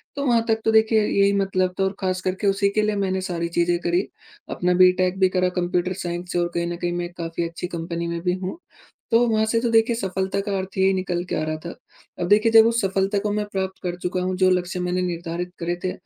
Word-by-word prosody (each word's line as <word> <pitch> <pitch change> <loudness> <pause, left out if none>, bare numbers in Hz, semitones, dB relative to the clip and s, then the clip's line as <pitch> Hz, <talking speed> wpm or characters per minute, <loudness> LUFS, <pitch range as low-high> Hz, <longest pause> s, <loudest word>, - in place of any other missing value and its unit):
तो 280 0 -2
वहाँ 235 -3 +3
तक 220 -1 +2
तो 225 - +4
देखिए 220 0 +4
यही 200 0 +3
मतलब 185 -2 0
था - - +3
और 190 0 -1
ख़ास 185 -1 -1
करके 185 +2 -1
उसी 200 0 +2
के 215 +2 +1
लिए 210 0 0
मैंने 190 -2 -1
सारी 175 -2 -3
चीजें 175 0 +1
करी 175 +2 0 0.4
अपना 180 0 0
बी. 180 0 +6
टेक 185 0 0
भी 190 -1 +4
करा 185 0 +1
कंप्यूटर 180 0 -1
साइंस 175 -1 -5
से 175 - 0
और 175 - +1
कहीं 170 0 -1
न 175 - -3
कहीं 175 0 -2
मैं 175 0 -3
काफ़ी 170 0 -3
अच्छी 170 +1 -6
कंपनी 170 0 -4
में 170 0 -3
भी 180 +1 0
हूँ 190 - -5 0.5
तो 235 +1 +4
वहाँ 220 -1 +2
से 230 +1 +1
तो 235 0 0
देखिए 225 +1 +3
सफ़लता 190 -2 -2
का 200 -1 -1
अर्थ 190 +1 -6
यही 190 0 +4
निकल 185 -2 -2
के - - -4
आ - - -1
रहा 155 0 -2
था। 170 - -6 0.5
अब 175 - -1
देखिए, 215 +3 +4
जब 225 0 +8
उस 230 0 +2
सफ़लता 195 +1 0
को 210 +1 -2
मैं 210 0 -1
प्राप्त 190 -1 -3
कर 175 -2 -3
चुका 180 +1 -1
हूँ 185 0 -1
जो 185 0 +3
लक्ष्य 180 0 -1
मैंने 180 +1 -1
निर्धारित 175 0 -4
करे 175 +1 -2
थे 185 - 0
185 Hz, 255 wpm, -23 LUFS, 175-200 Hz, 0.5 s, जब